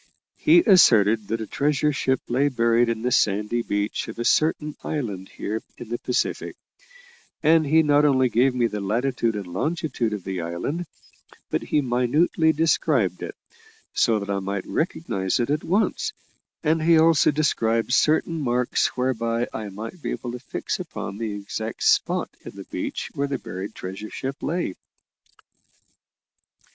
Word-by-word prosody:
He 335 +3 +6
asserted 110 - +5
that 115 +2 -2
a - - -3
treasure 150 +4 +1
ship 130 -2 0
lay 135 +4 +2
buried 115 -1 +2
in 115 -1 -2
the 125 - 0
sandy 105 +2 +1
beach 105 -1 -2
of 110 - -8
a 120 - -3
certain 150 0 +2
island 105 -11 -4
here 110 +2 -3 0.2
in 115 - -9
the 120 - -3
Pacific, 125 - -2 0.9
and 160 0 +4
he 160 +3 +5
not 145 -1 +4
only 130 -3 +4
gave 125 +2 +2
me 120 -1 +2
the 105 -3 -2
latitude 115 +2 0
and 100 -2 -4
longitude 130 - -2
of 105 -3 -5
the 95 -2 -3
island, 90 - -3 0.6
but - - 0
he 150 - +1
minutely 140 +6 +2
described 160 +1 +1
it, - - -6 0.6
so 115 -3 +3
that 100 -1 -4
I 100 - 0
might 95 0 -3
recognise 115 - -1
it 120 +3 0
at 150 +1 0
once, 220 - 0 0.5
and 160 +1 +2
he 165 +1 +5
also 160 -1 +5
described 120 -6 +1
certain 160 +3 +2
marks 125 -2 +1
whereby 120 -2 0
I 110 -2 -5
might 110 - -8
be - - -3
able 120 - -4
to 125 - -6
fix 125 - -4
upon 100 +2 -6
the 110 -3 -3
exact 105 +2 -5
spot - - +2
in - - -10
the - - -8
beach - - -4
where 140 0 -1
the 140 -1 -2
buried 95 -1 -7
treasure 95 +3 -7
ship 135 +1 -5
lay." 170 - -2
120 Hz, 160 wpm, -24 LUFS, 110-150 Hz, 0.9 s, He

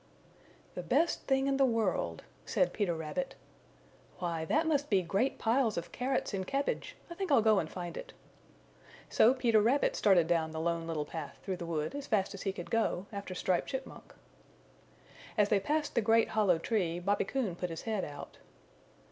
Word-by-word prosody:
"The - - -4
Best 340 - +1
Thing 270 0 +2
in 275 0 +1
the 275 - +4
World," 215 - 0 0.2
said - - +1
Peter 195 -6 0
Rabbit. 160 - -4 0.8
"Why, 170 -3 -2
that 310 - +2
must 290 -2 +1
be 195 -3 +3
great 205 +10 0
piles 230 -1 +1
of 170 - -4
carrots 255 -3 -1
and 190 -1 -2
cabbage! 275 +1 -2
I 340 - -7
think 375 -1 -3
I'll 245 -6 +5
go 215 -2 +5
and 155 - -3
find 175 -2 -6
it." - - -7 1.0
So 230 - +5
Peter 230 -4 +3
Rabbit 250 +7 +2
started 185 -5 +4
down 165 -1 +1
the 160 - -3
Lone 165 0 -1
Little 155 -3 -2
Path 150 -2 -7
through 190 -2 -3
the 170 - -6
wood 155 -2 -2
as 285 0 -6
fast 200 -3 +1
as 195 - -8
he 195 - -1
could 180 -2 -8
go 225 -4 +1
after 200 -2 -5
Striped 180 0 0
Chipmunk. 265 0 -7 1.2
As 205 -1 +4
they 205 - +4
passed 295 +8 -1
the - - +2
great 225 +1 +3
hollow 200 -6 +3
tree 175 -2 -1
Bobby 200 +4 0
Coon 220 -6 -2
put 180 0 -3
his 165 - -6
head 215 -4 -1
out. 145 -1 -8
200 Hz, 190 wpm, -32 LUFS, 170-250 Hz, 1.2 s, I'll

